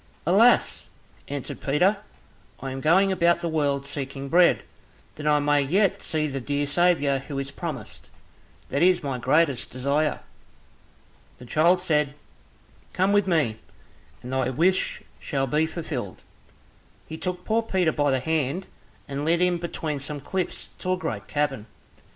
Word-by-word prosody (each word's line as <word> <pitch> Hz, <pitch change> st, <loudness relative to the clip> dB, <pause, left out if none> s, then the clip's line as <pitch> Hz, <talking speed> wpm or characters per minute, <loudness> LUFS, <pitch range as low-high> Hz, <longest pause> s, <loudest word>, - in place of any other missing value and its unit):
"Alas!" -, -, +4 dB, 0.4 s
answered 140 Hz, -2 st, -6 dB
Peter, 180 Hz, +9 st, +2 dB, 0.6 s
"I 135 Hz, 0 st, -5 dB
am 135 Hz, 0 st, -5 dB
going 190 Hz, +6 st, +4 dB
about 170 Hz, -2 st, +2 dB
the 170 Hz, -, -2 dB
world 145 Hz, -3 st, 0 dB
seeking 140 Hz, -1 st, -5 dB
bread, 175 Hz, +2 st, +4 dB, 0.5 s
that 150 Hz, -, -6 dB
I 150 Hz, 0 st, +5 dB
may 145 Hz, 0 st, +3 dB
yet 185 Hz, +8 st, +1 dB
see 155 Hz, -1 st, -1 dB
the 135 Hz, -2 st, -3 dB
dear 145 Hz, +3 st, -1 dB
Saviour 145 Hz, -3 st, +2 dB
who 135 Hz, +1 st, -7 dB
is 135 Hz, 0 st, -3 dB
promised, -, -, -7 dB, 0.6 s
that 140 Hz, -, -1 dB
is 180 Hz, -1 st, +4 dB
my 135 Hz, -3 st, -3 dB
greatest 135 Hz, +1 st, +2 dB
desire." 140 Hz, +4 st, 0 dB, 1.2 s
The 125 Hz, -, -12 dB
child 170 Hz, +7 st, +3 dB
said, 150 Hz, -4 st, +1 dB, 0.8 s
"Come 190 Hz, +2 st, +2 dB
with 205 Hz, -1 st, +3 dB
me, 145 Hz, -11 st, +1 dB, 0.6 s
and 125 Hz, +2 st, -6 dB
thy 130 Hz, -1 st, +1 dB
wish 175 Hz, +8 st, +1 dB, 0.2 s
shall 135 Hz, -4 st, -1 dB
be 150 Hz, +4 st, +1 dB
fulfilled." 145 Hz, -, -5 dB, 0.8 s
He 160 Hz, -, -7 dB
took 180 Hz, +2 st, -4 dB
poor 225 Hz, +1 st, +2 dB
Peter 190 Hz, -7 st, +1 dB
by 145 Hz, -1 st, +1 dB
the 130 Hz, -1 st, +2 dB
hand, 160 Hz, +4 st, -1 dB, 0.4 s
and 140 Hz, 0 st, -4 dB
led 165 Hz, +2 st, +2 dB
him 180 Hz, -1 st, +2 dB
between 160 Hz, -3 st, -3 dB
some 145 Hz, +1 st, -5 dB
cliffs 185 Hz, +6 st, -4 dB
to 185 Hz, -, 0 dB
a -, -, -1 dB
great 110 Hz, -, -4 dB
cavern. 135 Hz, -7 st, -1 dB
150 Hz, 150 wpm, -25 LUFS, 135-175 Hz, 1.2 s, I